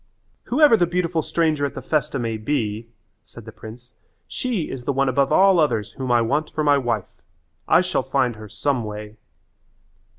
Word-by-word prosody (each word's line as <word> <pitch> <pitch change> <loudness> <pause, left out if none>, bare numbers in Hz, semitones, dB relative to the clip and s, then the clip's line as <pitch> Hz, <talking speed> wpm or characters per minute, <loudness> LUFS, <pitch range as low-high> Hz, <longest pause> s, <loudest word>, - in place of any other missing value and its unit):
"Whoever 285 -1 +5
the 175 - +2
beautiful 175 -1 -1
stranger 155 -3 0
at 140 - -2
the - - -6
festa 150 -2 -1
may 115 -3 -2
be," 110 -2 -2 0.4
said 115 -1 -14
the 110 - -9
prince, 120 +3 -12 0.3
"she 235 -11 -2
is 125 -2 -7
the - - +1
one 135 0 +1
above 135 +1 +1
all 190 -2 +5
others 115 -9 0
whom 130 -2 -4
I 120 -1 +4
want 145 +7 -1
for 155 - -3
my 145 -1 +4
wife. 115 -6 -3 0.5
I - - +5
shall - - -1
find 125 -3 0
her 110 -1 -10
some 135 +2 -1
way." 105 0 -8
135 Hz, 185 wpm, -22 LUFS, 115-155 Hz, 0.5 s, Whoever